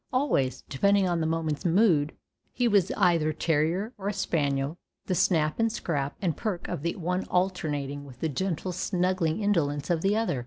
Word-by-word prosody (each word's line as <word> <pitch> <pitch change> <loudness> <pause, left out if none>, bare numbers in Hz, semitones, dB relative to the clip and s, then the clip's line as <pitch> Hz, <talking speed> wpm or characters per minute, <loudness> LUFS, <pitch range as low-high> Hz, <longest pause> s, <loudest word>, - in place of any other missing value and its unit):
Always, 140 - +1
depending 200 +7 +2
on 175 -1 0
the 160 - 0
moment's 160 -2 -1
mood, 170 -5 +3 0.4
he 245 -1 +1
was 200 -4 +3
either 165 -3 +3
terrier 165 +8 0
or 200 +1 -1
spaniel, 145 -5 -1 0.3
the 185 - -1
snap 165 -3 +2
and 225 0 +2
scrap 145 -10 -2
and 170 -5 +1
perk 195 -6 -3
of - - -4
the 170 +2 -2
one 180 +1 -2
alternating 150 -6 -1
with 130 -3 -13
the 160 - 0
gentle 180 +4 -2
snuggling 180 0 0
indolence 150 -6 +1
of 165 -2 +1
the 200 +3 +2
other. 220 - 0
170 Hz, 170 wpm, -27 LUFS, 150-190 Hz, 0.4 s, mood